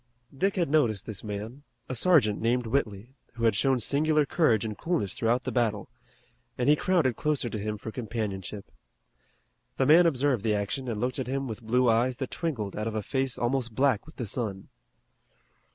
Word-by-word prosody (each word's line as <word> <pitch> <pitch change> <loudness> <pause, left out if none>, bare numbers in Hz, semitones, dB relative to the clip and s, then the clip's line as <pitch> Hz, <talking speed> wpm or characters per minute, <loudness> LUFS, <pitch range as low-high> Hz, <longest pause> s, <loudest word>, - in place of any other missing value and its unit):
Dick 195 +8 0
had 175 -3 +1
noticed 120 -11 +2
this 110 -4 -7
man, 110 +5 -6 0.3
a - - -4
sergeant 125 - +3
named 120 +2 +1
Whitley, 110 -1 -2 0.2
who 115 -1 -6
had 115 -2 +4
shown 135 +4 +2
singular 150 +5 +2
courage 120 - +2
and 105 -1 -4
coolness 160 - -1
throughout 120 +2 0
the - - -3
battle, 110 -4 0 0.7
and 125 - 0
he 150 - +6
crowded 155 -7 +1
closer 150 -3 -1
to 110 - -3
him 105 +1 -3
for 110 +2 -7
companionship. 105 -4 -5 1.1
The 135 - +2
man 165 +5 +7
observed 135 -6 +1
the 110 -2 +1
action 105 +6 -3
and 110 -3 -3
looked 125 +3 -2
at 130 - -3
him 135 +1 -2
with 110 0 -6
blue 125 +3 +2
eyes 120 +2 +2
that 130 -2 -4
twinkled 125 - -3
out 105 +1 -3
of 110 - -3
a 110 - -2
face 130 +2 -1
almost 120 -2 -1
black 135 -3 +2
with 155 - -14
the 120 - -4
sun. 100 -3 -4
120 Hz, 190 wpm, -28 LUFS, 110-135 Hz, 1.1 s, man